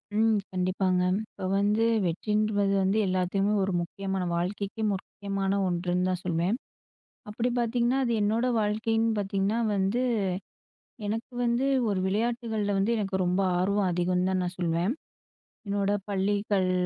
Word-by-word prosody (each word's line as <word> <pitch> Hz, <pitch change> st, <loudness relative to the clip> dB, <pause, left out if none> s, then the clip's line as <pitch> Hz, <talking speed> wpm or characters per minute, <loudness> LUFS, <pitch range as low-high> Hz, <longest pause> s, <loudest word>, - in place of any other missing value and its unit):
ம், 220 Hz, 0 st, +4 dB
கண்டிப்பாங்க, 185 Hz, 0 st, +1 dB, 0.3 s
இப்போ -, -, -7 dB
வந்து 210 Hz, +3 st, +2 dB, 0.2 s
வெற்றிங்கிறது 205 Hz, +3 st, +1 dB
வந்து 195 Hz, +3 st, +2 dB
எல்லாத்துக்குமே 185 Hz, +2 st, +1 dB
ஒரு 195 Hz, -, 0 dB
முக்கியமான 190 Hz, +2 st, -3 dB
வாழ்க்கைக்கே 200 Hz, +5 st, -3 dB
முக்கியமான 195 Hz, 0 st, -2 dB
ஒன்றுன்னு 180 Hz, +1 st, 0 dB
தான் 180 Hz, -1 st, -2 dB
சொல்லுவேன், 175 Hz, +5 st, +1 dB, 0.7 s
அப்படி 230 Hz, +4 st, -1 dB
பார்த்தீங்கன்னா 240 Hz, +2 st, +1 dB
அது 240 Hz, -, 0 dB
என்னோடய 230 Hz, +4 st, +1 dB
வாழ்க்கைன்னு 225 Hz, +2 st, +1 dB
பார்த்தீங்கன்னா 200 Hz, +2 st, 0 dB, 0.2 s
வந்து, 195 Hz, +5 st, +1 dB, 1.1 s
எனக்கு 225 Hz, +4 st, -3 dB
வந்து, 240 Hz, +3 st, +1 dB, 0.2 s
ஒரு 195 Hz, -, 0 dB
விளையாட்டுகள்ல 220 Hz, -1 st, -1 dB
வந்து 215 Hz, +4 st, +2 dB
எனக்கு 195 Hz, -2 st, -1 dB
ரொம்ப 180 Hz, +2 st, +1 dB, 0.2 s
ஆர்வம் 200 Hz, +1 st, +1 dB
அதிகம் 180 Hz, +1 st, +1 dB
தான் 190 Hz, -1 st, +1 dB
நான் 180 Hz, 0 st, -4 dB
சொல்லுவேன், 170 Hz, +4 st, +1 dB, 0.7 s
என்னோட 200 Hz, 0 st, 0 dB, 0.2 s
பள்ளிகள் 200 Hz, -1 st, +1 dB
200 Hz, 125 wpm, -28 LUFS, 185-220 Hz, 1.1 s, ம்